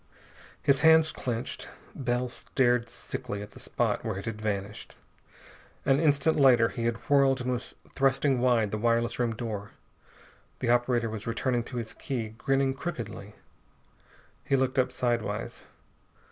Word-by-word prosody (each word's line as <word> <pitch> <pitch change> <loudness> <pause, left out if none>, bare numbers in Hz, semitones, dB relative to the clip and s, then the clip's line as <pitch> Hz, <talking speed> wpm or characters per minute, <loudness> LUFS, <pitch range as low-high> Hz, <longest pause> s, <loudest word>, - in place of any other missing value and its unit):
His 140 -1 +3
hands 160 0 +6
clenched. 120 -2 -4 0.2
Bell 125 -1 -1
stared 120 -1 0
sickly 105 -2 -5
at 105 - -11
the - - -13
spot - - -1
where - - -3
it 100 - -6
had 110 -2 -5
vanished. 105 -1 -4 0.9
An 135 0 +4
instant 155 0 +3
later 120 -5 +6
he 115 - -4
had 115 -1 0
whirled 140 -2 +4
and 125 +1 -1
was 125 -1 -4 0.2
thrusting 135 0 +2
wide 120 -4 +2
the 110 - -2
wireless 115 +1 +1
room 115 -2 0
door. 105 -3 -5 0.8
The 120 -2 0
operator 120 -1 +2
was 110 0 -6
returning 120 +2 0
to 125 - -7
his 115 -2 -4
key, 120 -7 -4
grinning 135 +4 0
crookedly. 120 - -6 1.1
He 135 - +1
looked 130 0 +1
up 130 0 +2
sidewise. 120 -2 -2
120 Hz, 145 wpm, -28 LUFS, 115-135 Hz, 1.1 s, hands